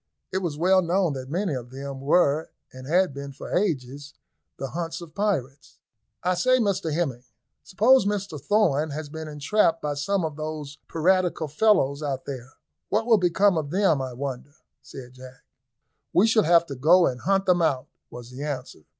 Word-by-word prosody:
It 190 - 0
was 170 -6 -3
well 185 +3 +4
known 175 -2 +1
that 130 -1 -7
many 180 +2 -1
of 125 -2 -5
them 135 +1 -7
were, 150 +1 +2 0.2
and 130 0 -10
had 180 0 +2
been 140 0 -7
for 135 - -6
ages, 145 -6 -2 0.4
the 135 - -5
haunts 165 +1 -4
of 170 -3 -11
pirates. 150 -10 -3 0.5
"I 180 - +2
say, 255 +9 +3
Hemming, 165 - -1 0.4
suppose 225 +3 +4
Mr 195 -7 -3
Thorn 155 -5 +2
has 150 +1 -6
been 160 +1 -7
entrapped 160 +4 +1
by 150 -2 -2
some 175 +5 -1
of 155 -2 -5
those 155 -1 -6
piratical 175 -1 +1
fellows 150 -4 +2
out 140 -3 -3
there; 130 -1 -7 0.4
what 220 +2 +1
will 225 -3 +4
become 180 0 +3
of 145 -2 -5
them, 175 -5 +2
I 130 -1 -5
wonder?" 135 +2 -6 0.3
said 130 -2 -11
Jack. 130 0 -14 0.7
"We 185 - +5
shall 220 -2 +3
have 170 +1 +5
to 140 - -7
go 170 +7 +5
and 125 -1 -2
hunt 195 0 +1
them 180 -2 +3
out," 135 -6 +1 0.2
was 120 0 -10
the 130 +2 -9
answer. 135 - -6
155 Hz, 175 wpm, -25 LUFS, 140-185 Hz, 0.7 s, We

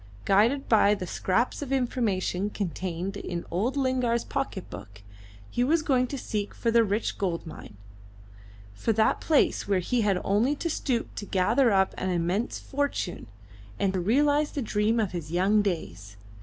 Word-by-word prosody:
Guided 225 +8 +3
by 210 -2 +5
the 185 - -5
scraps 195 - -1
of 275 -2 -5
information 210 -7 0
contained 185 -1 -4
in 175 -3 -5
old 230 +11 -1
Lingard's 255 -3 +1
pocket 270 -9 -4
book, 100 0 -11 0.5
he 245 - +1
was 310 +5 +2
going 255 -4 +2
to 280 - -5
seek 210 -5 -4
for 230 - 0
the 230 0 +5
rich 210 +1 -2
gold 180 -4 -2
mine, 130 -9 -10 1.0
for 225 - 0
that 220 +1 +2
place 305 -8 +2
where 200 -1 +2
he 230 +7 0
had 200 -4 +2
only 225 +9 +2
to 335 +3 -3
stoop 250 -6 -2
to 205 - -6
gather 225 +7 +3
up 190 -1 +2
an 185 - -1
immense 180 +6 -1
fortune 280 - -3 0.5
and 190 -2 -1
realise 290 +5 +3
the 285 - -4
dream 220 +1 +1
of 210 -4 0
his 170 -3 -6
young 195 +5 +3
days. 100 - -4
210 Hz, 165 wpm, -27 LUFS, 185-250 Hz, 1.0 s, by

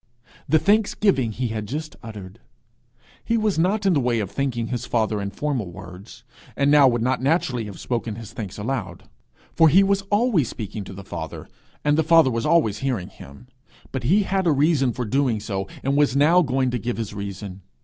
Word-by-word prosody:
The 160 - +5
thanksgiving 200 - +2
he 120 +2 -3
had 110 -1 -4
just 155 +5 -5
uttered. 105 -5 -10 0.8
He 230 - 0
was 215 -6 0
not 200 +5 +1
in 190 - +4
the 150 - +2
way 120 -3 +1
of 100 -3 -3
thanking 120 -4 -2
his 125 -3 -4
father 110 -3 0
in 100 - -3
formal 125 -3 -3
words; 90 +3 -12 0.3
and 140 0 +2
now 145 -2 +7
would 120 -2 +1
not 130 0 0
naturally 130 -5 0
have 100 -3 -9
spoken 115 -3 -3
his 115 -1 -10
thanks 100 -3 -6
aloud; 105 -5 -4 0.5
for 165 -1 +5
he 190 +6 +6
was 200 0 +1
always 205 - +2
speaking 105 -1 -6
to - - -9
the 100 +1 -9
Father, 85 -3 -7 0.4
and 150 +1 +2
the - - +3
Father 165 -4 +5
was 115 +2 -1
always 150 -11 +2
hearing 125 -9 -2
him; 70 - -14 0.5
but 130 - -3
he 185 - +3
had 190 -1 0
a - - +5
reason 140 -2 +2
for 125 +1 -4
doing 125 -1 +1
so, 95 -2 -4 0.2
and 135 +1 0
was 145 -2 +2
now 160 +6 +5
going 130 -4 0
to 125 - -2
give 120 +1 -3
his 110 -3 -4
reason. 100 -1 -7
125 Hz, 200 wpm, -23 LUFS, 105-155 Hz, 0.8 s, now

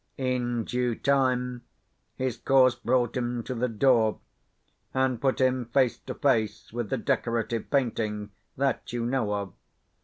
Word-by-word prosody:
In 125 -3 -1
due 125 0 -1
time, 125 -2 +1 0.5
his 130 -3 -2
course 130 +1 +4
brought 120 -1 0
him 120 -1 -2
to 130 - -4
the 125 +1 0
door, 115 -1 +3 0.8
and 130 -3 +1
put 135 -2 +1
him 130 -1 +2
face 125 +1 +2
to 130 - -7
face 110 -7 0
with 120 -3 -3
the - - 0
decorative 115 -1 -1
painting 110 -6 -1 0.3
that 135 +1 -1
you 120 -1 -1
know 120 -4 0
of. 100 -3 -4
125 Hz, 145 wpm, -27 LUFS, 115-130 Hz, 0.8 s, course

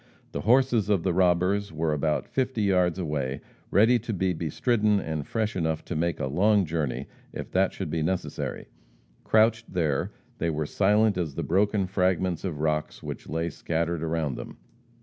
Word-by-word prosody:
The - - -3
horses 120 -3 +3
of 100 -5 +2
the 95 - +1
robbers 90 +2 +2
were 80 0 0
about 75 +1 0
fifty 130 -4 -1
yards 90 -3 +2
away 75 -6 -2 0.3
ready 115 +5 +5
to 115 +1 -5
be 95 -1 0
bestridden, 105 - +1
and 80 -5 -4
fresh 110 -1 -1
enough 80 -3 -1
to 90 - -4
make 85 +1 -1
a - - -1
long 100 +8 +3
journey 80 -4 -2 0.3
if - - -7
that - - +2
should - - -5
be 80 - -1
necessary. 90 +4 -3 0.6
Crouched 115 +1 +3
there, 80 -6 0 0.3
they 85 - 0
were 75 -1 -1
silent 105 +3 +2
as 80 -6 -3
the - - -2
broken 100 +2 +2
fragments 90 -2 0
of 80 -6 -3
rocks 75 -1 -1
which - - -7
lay 80 +1 -1
scattered 85 +1 -2
around 80 -3 -1
them. - - -8
90 Hz, 170 wpm, -27 LUFS, 80-105 Hz, 0.6 s, ready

